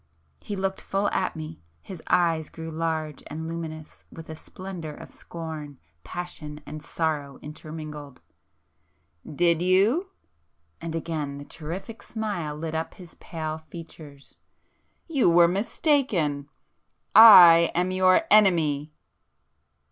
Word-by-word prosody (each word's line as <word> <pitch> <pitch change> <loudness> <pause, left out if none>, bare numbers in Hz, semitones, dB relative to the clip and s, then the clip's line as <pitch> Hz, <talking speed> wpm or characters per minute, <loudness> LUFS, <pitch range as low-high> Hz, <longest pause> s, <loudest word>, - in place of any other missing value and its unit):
He 205 - -6
looked 190 0 -3
full 200 +1 -1
at 185 - -2
me,... 155 0 -8 0.2
his 185 -4 -9
eyes 165 -3 +1
grew 160 0 -8
large 160 -2 -3
and 160 +2 -6
luminous 160 -2 -7
with 165 -1 -10
a - - -7
splendour 170 -2 -8
of - - -12
scorn, 155 -4 -8 0.3
passion 155 -4 -7
and 155 0 -8
sorrow 150 -4 -3
intermingled. 150 -2 -9 1.1
"Did 170 +2 +2
you?" 205 - +2 0.7
and 165 -1 -5
again 155 -4 -4
the 145 - -9
terrific 185 +9 -7
smile 200 -11 -4
lit 160 +1 -5
up 160 0 -4
his 175 -3 -13
pale 160 -2 -6
features,—"You 160 - -6
were 170 0 +6
mistaken! 190 - 0 0.6
I 175 -7 +9
am 180 +2 +1
your 185 - +4
Enemy!" 160 -8 +3
165 Hz, 115 wpm, -25 LUFS, 155-185 Hz, 1.1 s, I